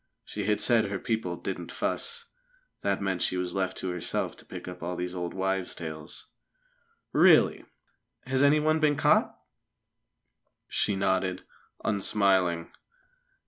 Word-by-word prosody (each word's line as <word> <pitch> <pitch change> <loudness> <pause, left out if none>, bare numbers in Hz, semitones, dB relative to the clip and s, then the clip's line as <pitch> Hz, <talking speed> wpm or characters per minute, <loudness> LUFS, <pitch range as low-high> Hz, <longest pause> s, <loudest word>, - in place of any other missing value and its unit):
She 105 -2 -4
had 105 0 +1
said 115 -3 +4
her 100 -1 -3
people 110 -5 -2
"didn't - - -5
fuss." 470 0 -2 0.6
That 100 0 0
meant 95 -2 -1
she 90 - +1
was 90 -1 -2
left 95 -2 -1
to 95 - -2
herself 90 -2 -2
to - - -12
pick - - -8
up 90 0 -8
all 90 +2 -3
these 90 0 -4
old 90 -1 -4
wives' 95 -1 -1
tales. 80 -1 -7 0.9
"Really! - - +5 0.6
Has 130 +1 +1
anyone 155 +2 +4
been 150 -1 +3
caught?" - - +3 1.3
She 105 - 0
nodded, 95 -1 0 0.4
unsmiling. 95 -5 +2
95 Hz, 135 wpm, -28 LUFS, 90-110 Hz, 1.3 s, Really